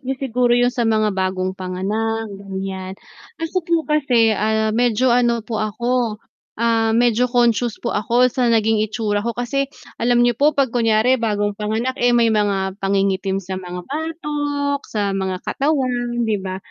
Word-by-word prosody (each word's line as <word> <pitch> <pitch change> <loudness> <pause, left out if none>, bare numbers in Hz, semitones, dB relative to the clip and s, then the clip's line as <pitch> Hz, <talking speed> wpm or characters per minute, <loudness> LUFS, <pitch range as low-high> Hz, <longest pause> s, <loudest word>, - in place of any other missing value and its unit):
nyo 265 -1 -3
siguro 250 -2 +1
yun 245 0 +2
sa 235 -2 0
mga 215 -1 +2
bagong 185 -1 -1
panganak, 205 +4 -3
ganyan. 190 -1 -6 0.4
Ako 330 +3 -2
po 335 -1 0
kasi, 255 -7 +3
ah, 220 +1 0
medyo 240 +2 +2
ano 235 -2 +2
po 220 -2 -3
ako, 235 +1 -1 0.4
ah, 225 0 +2
medyo 240 +1 +3
conscious 240 -2 +1
po 235 - -3
ako 235 +4 +2
sa 250 -1 +1
naging 225 -1 +3
itsura 215 -1 -1
ko 235 +2 -3
kasi 275 +3 -1 0.3
alam 240 +1 +3
niyo 240 - +3
po 295 +1 +4
pag 270 -4 +1
kunyari 235 +1 +2
bagong 205 -2 0
panganak, 220 +5 -2
eh, 245 0 +4
may 230 -1 +3
mga 200 -2 0
pangingitim 195 0 0
sa 190 +1 -5
mga 180 0 -7
batok, 290 - -2
sa 205 -2 -1
mga 190 -1 -2
katawan, 250 -4 -1
'di 215 -2 0
ba. 185 0 -4
225 Hz, 160 wpm, -20 LUFS, 205-245 Hz, 0.4 s, po